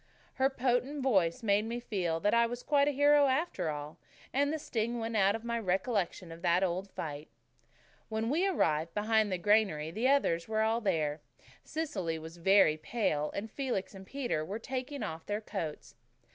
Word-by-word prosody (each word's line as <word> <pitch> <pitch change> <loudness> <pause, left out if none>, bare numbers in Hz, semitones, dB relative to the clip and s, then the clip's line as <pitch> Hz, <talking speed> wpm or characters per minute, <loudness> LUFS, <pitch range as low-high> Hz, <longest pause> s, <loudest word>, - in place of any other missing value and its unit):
Her 265 - +5
potent 265 +2 0
voice 195 -4 +2
made 205 0 +2
me 235 +2 -3
feel 180 -9 -2
that 205 - +2
I 235 0 +4
was 245 +1 -6
quite 285 -1 +3
a - - +3
hero 290 +1 +5
after 270 - 0
all, 150 0 -6 0.3
and 285 +2 +2
the 315 - -1
sting 235 -4 -2
went 225 0 -3
out 200 0 +4
of 225 - -6
my 235 0 -1
recollection 190 -3 -1
of 165 +1 -10
that 175 +1 +3
old 185 +2 -1
fight. 150 -3 -6 0.8
When 220 +2 -1
we 345 +6 +2
arrived 165 - 0
behind 215 0 +2
the 185 - 0
granary 175 -5 +2
the 225 +8 0
others 170 -12 +2
were 220 0 +1
all 225 +2 +1
there. 155 -7 0 0.4
Cecily 190 - -3
was 160 +2 -9
very 170 -3 +5
pale, 155 -5 -1
and 215 +2 -4
Felix 250 -9 -3
and 190 -1 -11
Peter 245 - -2
were 195 +7 -4
taking 260 +4 -4
off 160 0 -6
their 205 0 -1
coats. 190 -8 -6
215 Hz, 185 wpm, -31 LUFS, 170-250 Hz, 0.8 s, Her